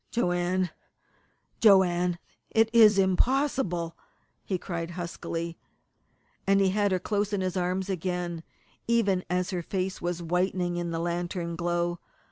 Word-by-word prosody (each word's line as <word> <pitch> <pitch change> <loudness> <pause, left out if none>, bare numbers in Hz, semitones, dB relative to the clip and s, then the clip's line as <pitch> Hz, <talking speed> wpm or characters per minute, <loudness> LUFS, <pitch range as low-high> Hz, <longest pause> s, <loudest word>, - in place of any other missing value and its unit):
"Joanne 180 -4 0 0.9
Joanne, 180 -4 +4 0.3
it 225 0 +3
is 215 -3 +7
impossible!" 190 - +1 0.5
he 190 - -1
cried 170 -2 -4
huskily, 170 -1 -4 0.9
and 195 0 +4
he 195 -1 +4
had 205 +1 +1
her 185 - +3
close 205 +2 -1
in 200 - 0
his 185 -1 -2
arms 185 +1 -1
again, 180 -2 -3 0.5
even 205 -6 +2
as 180 +1 0
her 180 -2 -2
face 185 +2 -3
was 175 0 -2
whitening 180 +1 0
in 175 0 -2
the 165 - -2
lantern 170 0 -2
glow. 175 0 -1
180 Hz, 130 wpm, -28 LUFS, 175-195 Hz, 0.9 s, is